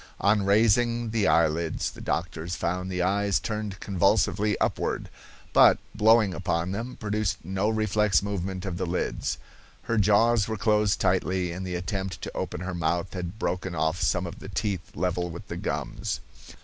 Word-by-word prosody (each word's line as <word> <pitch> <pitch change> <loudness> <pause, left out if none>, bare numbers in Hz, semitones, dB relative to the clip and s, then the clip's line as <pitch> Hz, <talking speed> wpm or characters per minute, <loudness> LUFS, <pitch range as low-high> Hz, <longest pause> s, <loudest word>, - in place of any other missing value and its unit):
On 100 +1 +3
raising 115 +3 +3
the 110 -3 +2
eyelids, 80 -1 +1
the - - -12
doctors 85 0 -2
found 90 +2 -2
the 90 -1 -1
eyes 100 -2 +2
turned 105 +2 -4
convulsively 100 +2 +2
upward, - - -1 0.4
but, - - +7 0.2
blowing 110 -2 +4
upon 85 0 -1
them, 115 +5 -4
produced 105 -3 -1
no 95 +4 0
reflex 105 -4 +2
movement 95 -2 -3
of 90 -3 -3
the 90 0 -2
lids. 90 +2 -2 0.5
Her 115 -1 0
jaws 110 +2 +4
were 110 0 -3
closed 105 -1 +2
tightly, 90 -1 +1
and 95 +2 -5
the 90 - -3
attempt 95 0 -3
to - - -6
open - - -3
her 95 0 -4
mouth 85 0 -1
had 90 +1 -5
broken 90 -4 -2
off 80 +3 0
some 90 0 +1
of 85 - -7
the - - -9
teeth 100 -5 -3
level 90 0 -1
with 85 0 -9
the - - -4
gums. - - -3
95 Hz, 165 wpm, -27 LUFS, 90-105 Hz, 0.5 s, but